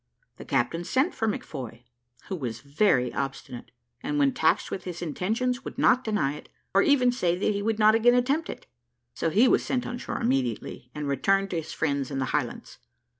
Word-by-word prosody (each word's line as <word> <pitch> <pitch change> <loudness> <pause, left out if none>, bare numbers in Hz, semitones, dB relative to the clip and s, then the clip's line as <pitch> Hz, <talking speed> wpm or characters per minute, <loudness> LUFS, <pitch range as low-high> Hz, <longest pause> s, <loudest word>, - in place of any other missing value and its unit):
The - - -10
captain 165 +8 0
sent 265 - +1
for 225 - -1
McFoy, 125 - -5 0.4
who 190 - -3
was 120 -8 -5
very 140 - +2
obstinate, 135 -3 -5 0.3
and 290 +3 -2
when 280 -2 +3
taxed - - +1
with 190 - -4
his 175 -2 -5
intentions 230 - -1
would - - -8
not 255 - +4
deny 205 - 0
it, 150 - -11 0.2
or 195 - +5
even 255 -2 +4
say 180 -8 0
that 205 +3 +1
he 200 - -2
would 220 +1 0
not 215 0 +6
again 240 +2 +5
attempt 275 +7 +1
it; - - -7 0.5
so 165 - -1
he 215 +10 +4
was - - +3
sent 250 -2 -1
on 245 0 -5
shore - - -4
immediately, 125 -1 -2
and 150 -1 -4
returned 195 +8 +1
to 175 - -1
his 160 - -10
friends 140 -4 -1
in 135 - -4
the 130 - 0
Highlands. - - -3
190 Hz, 200 wpm, -26 LUFS, -, 0.5 s, not